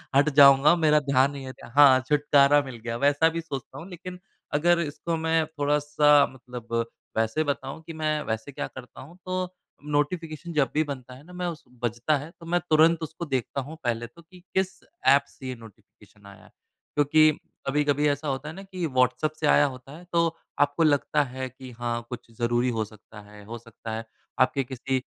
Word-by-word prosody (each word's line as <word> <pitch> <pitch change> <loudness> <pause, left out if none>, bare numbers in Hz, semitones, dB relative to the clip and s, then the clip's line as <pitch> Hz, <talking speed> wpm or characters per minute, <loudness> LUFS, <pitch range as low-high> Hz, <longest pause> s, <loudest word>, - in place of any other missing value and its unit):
हट 145 +2 +5
जाऊँगा। 140 +3 +8
मेरा 155 -3 +4
ध्यान 140 -1 +2
नहीं 140 -1 -8
है 130 - -7 0.2
हाँ, 140 -3 +8
छुटकारा 145 0 +4
मिल 130 -3 -8
गया 115 -1 -3
वैसा 145 +5 +3
भी 165 +1 -4
सोचता 135 -4 -7
हूँ। 170 +6 -9
लेकिन 180 0 -9 0.3
अगर 170 +3 +3
इसको 165 +1 -3
मैं 160 0 +1
थोड़ा-सा 145 -1 +3
मतलब 120 -2 -4 0.3
वैसे 115 +8 +1
बताऊँ 140 +1 -4
कि 165 - -6
मैं 155 -1 -1
वैसे 110 +4 -4
क्या - - -4
करता 125 -1 -11
हूँ 160 +7 -13
तो 185 0 -2 0.5
नोटिफिकेशन 160 +1 -2
जब 145 -3 +2
भी 155 - +2
बनता 130 -4 -7
है 130 +3 -14
ना 180 +3 -15
मैं 180 0 -4
उस 165 -3 -6 0.2
बजता 120 +6 +1
है 145 +3 -8
तो 165 - -12
मैं 175 +1 +1
तुरंत 160 +1 +5
उसको 160 +2 -6
देखता 130 +2 -1
हूँ 145 +5 -9
पहले 120 -1 -1
तो 150 +8 -18
कि 180 +2 -18
किस 190 0 +1 0.4
ऐप 140 +1 +6
से 130 - -11
ये 130 - -4
नोटिफिकेशन 110 -2 -18
आया 100 -1 -14
है। - - -18 0.5
क्योंकि 155 +1 +5 0.4
कभी-कभी 145 +1 +2
ऐसा 145 +1 -2
होता 135 +2 -3
है 160 - -8
ना 195 - -9
कि 185 -3 -5
व्हाट्सऐप 130 +2 +1
से 155 - +1
आया 145 - +5
होता 130 +3 -12
है 175 - -14
तो 165 -1 +1 0.2
आपको 145 +3 +2
लगता 150 0 +2
है 130 0 -5
कि 130 0 -12
हाँ 120 -1 -2
कुछ 120 -2 -8
जरूरी 120 +1 +1
हो 110 - 0
सकता 105 0 -15
है। 105 0 -14
हो 115 +3 -7
सकता 115 -1 -10
है 115 0 -5 0.3
आपके 135 +2 +3
किसी 130 +1 -2
145 Hz, 200 wpm, -26 LUFS, 130-155 Hz, 0.5 s, जाऊँगा